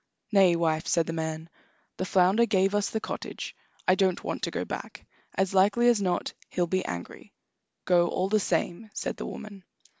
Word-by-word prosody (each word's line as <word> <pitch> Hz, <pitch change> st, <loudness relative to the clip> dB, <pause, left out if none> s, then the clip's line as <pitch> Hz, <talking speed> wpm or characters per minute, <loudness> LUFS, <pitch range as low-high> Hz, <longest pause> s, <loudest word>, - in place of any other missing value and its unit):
"Nay, 190 Hz, -4 st, +5 dB
wife," 165 Hz, 0 st, 0 dB
said 165 Hz, 0 st, +2 dB
the 165 Hz, -, -4 dB
man; 160 Hz, 0 st, -3 dB, 0.5 s
"the 185 Hz, -, -2 dB
flounder 190 Hz, +5 st, +4 dB
gave 195 Hz, -2 st, +2 dB
us 205 Hz, -1 st, +1 dB
the 220 Hz, -, -2 dB
cottage. -, -, -6 dB, 0.3 s
I 185 Hz, -, +6 dB
don't 190 Hz, -1 st, +1 dB
want -, -, -3 dB
to -, -, -1 dB
go -, -, -3 dB
back; -, -, -7 dB, 0.3 s
as 190 Hz, 0 st, 0 dB
likely 205 Hz, +5 st, +4 dB
as 230 Hz, -4 st, +3 dB
not 180 Hz, -2 st, -1 dB, 0.2 s
he'll 180 Hz, -, 0 dB
be 185 Hz, +2 st, 0 dB
angry." 85 Hz, -1 st, -7 dB, 0.5 s
"Go, 175 Hz, -1 st, +4 dB
all 185 Hz, +2 st, 0 dB
the 215 Hz, +2 st, +2 dB
same," 180 Hz, +3 st, -1 dB
said -, -, -3 dB
the -, -, -5 dB
woman. 200 Hz, -3 st, -8 dB
185 Hz, 185 wpm, -27 LUFS, 170-200 Hz, 0.5 s, I